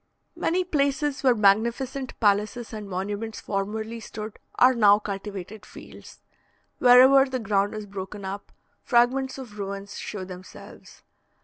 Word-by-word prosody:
Many 365 +2 0
places 285 -3 0
where 255 -3 +4
magnificent 235 +6 +1
palaces 215 +3 0
and 210 -2 -7
monuments 205 +4 -4
formerly 220 +3 -4
stood 215 -1 -8 0.2
are 255 +1 +5
now 205 -4 +5
cultivated 200 0 -7
fields. - - -13 0.6
Wherever 260 +2 +7
the 260 - -2
ground 205 -2 0
is 215 -1 -6
broken 195 0 -7
up, 195 +1 -7 0.3
fragments 260 +2 +2
of 230 -6 -10
ruins 200 0 -6
show 195 -3 -6
themselves. 185 0 -12
215 Hz, 125 wpm, -25 LUFS, 200-250 Hz, 0.6 s, Wherever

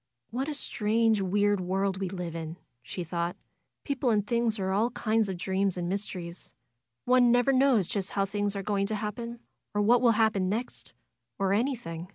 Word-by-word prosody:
^^What 265 +3 -1
a 305 - -2
strange, 220 -4 +1
weird 205 +1 +2
world 190 +1 0
we 190 -1 -2
live 175 -3 -5
in!" 165 0 -5 0.2
she 180 - -5
thought. 170 +1 -2 0.5
'^People 270 -3 0
and 205 -2 +2
things 235 0 +1
are 190 -1 -1
all 215 +5 +2
kind 220 -3 0
of 185 - -3
dreams 190 +1 0
and 175 -1 -2
mysteries. 180 -3 -4 0.5
One 250 -1 +5
never 245 +3 +4
knows 260 -6 +4
just 195 +2 -2
how 195 -1 +1
things 205 0 -1
are 195 - -3
going 200 0 0
to 215 - -2
happen; 230 +3 -5 0.3
or 205 - +2
what 240 +3 +5
will 235 -2 +5
happen 215 -4 +2
next; 230 +5 -4 0.4
or 195 -1 +1
any 255 +6 +1
thing. 165 -7 -7
205 Hz, 190 wpm, -28 LUFS, 190-235 Hz, 0.5 s, One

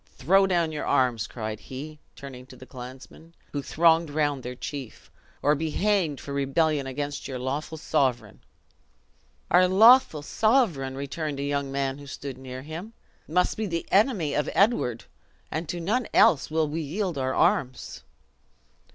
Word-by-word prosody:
Throw 195 +2 +4
down 170 -3 +1
your 150 - -4
arms!" 120 -3 +1
cried 110 -2 -5
he, 150 +4 -9 0.2
turning 130 -2 -10
to - - -13
the 130 - -13
clansmen, 130 +6 -11 0.2
who 145 - -3
thronged 165 +2 +3
round 145 -2 0
their 125 0 -6
chief; 135 -1 -8 0.3
"or 145 - +4
be 155 +2 -2
hanged 185 -5 0
for 140 - -7
rebellion 140 +1 +1
against 145 +2 -4
your 130 - -5
lawful 140 +5 -4
sovereign!" 135 -6 -1 1.1
"Our 185 - +6
lawful 215 - +6
sovereign!" 175 - +1
returned 140 +1 -4
a - - -2
young 140 -1 -2
man 135 0 -2
who 145 - -11
stood 135 -1 -7
near 130 0 -8
him, 170 +9 -8 0.3
"must 180 +4 +1
be 220 -1 -2
the 170 -2 -3
enemy 195 - +2
of 150 - 0
Edward; 195 - +2 0.5
and 160 +1 -4
to 175 - -3
none 215 +8 -1
else 145 - +5
will 160 0 +1
we 155 +3 -3
yield 170 +1 -3
our 130 0 -1
arms!" 130 -1 0
150 Hz, 160 wpm, -26 LUFS, 135-170 Hz, 1.1 s, Our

